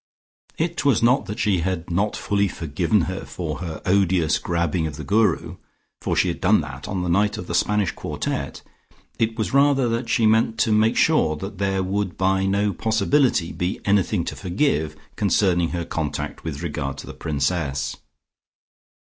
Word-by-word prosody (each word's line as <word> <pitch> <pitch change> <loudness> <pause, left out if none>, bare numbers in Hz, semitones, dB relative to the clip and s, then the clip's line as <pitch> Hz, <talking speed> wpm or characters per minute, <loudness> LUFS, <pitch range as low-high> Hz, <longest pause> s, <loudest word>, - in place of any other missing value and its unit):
It 170 +1 -1
was 135 -6 +3
not 125 +3 +3
that 105 - -5
she 105 -6 +1
had 90 0 -3
not 100 +5 0
fully 100 0 0
forgiven 85 +3 0
her 95 +3 -3
for 80 -4 -5
her 80 -3 -6
odious 90 -4 +2
grabbing 85 -1 -1
of 75 - -6
the 75 - -7
Guru, 105 +7 +1 0.4
for - - -1
she 90 - +2
had 85 - -4
done 100 +1 +4
that 70 -1 -8
on 95 -2 -2
the - - -2
night 105 +4 +2
of - - -6
the 85 - -5
Spanish 105 +1 +1
quartette; - - -4 0.6
it 115 0 0
was 110 - -2
rather 140 -2 +4
that 115 +1 -2
she 115 - +2
meant 110 +1 +3
to 115 - +2
make 110 +1 +3
sure 150 - +3
that 95 +5 -7
there 95 -1 0
would 95 0 -2
by 95 0 +2
no 100 +1 +1
possibility 110 - +1
be 90 +1 -2
anything 100 -2 +2
to - - -4
forgive 90 - 0 0.2
concerning 95 -4 +2
her 85 -1 -3
conduct 80 -3 -4
with 80 -1 -5
regard 75 -4 -3
to - - -8
the - - -8
Princess. 70 -3 -2
95 Hz, 175 wpm, -23 LUFS, 85-105 Hz, 0.6 s, done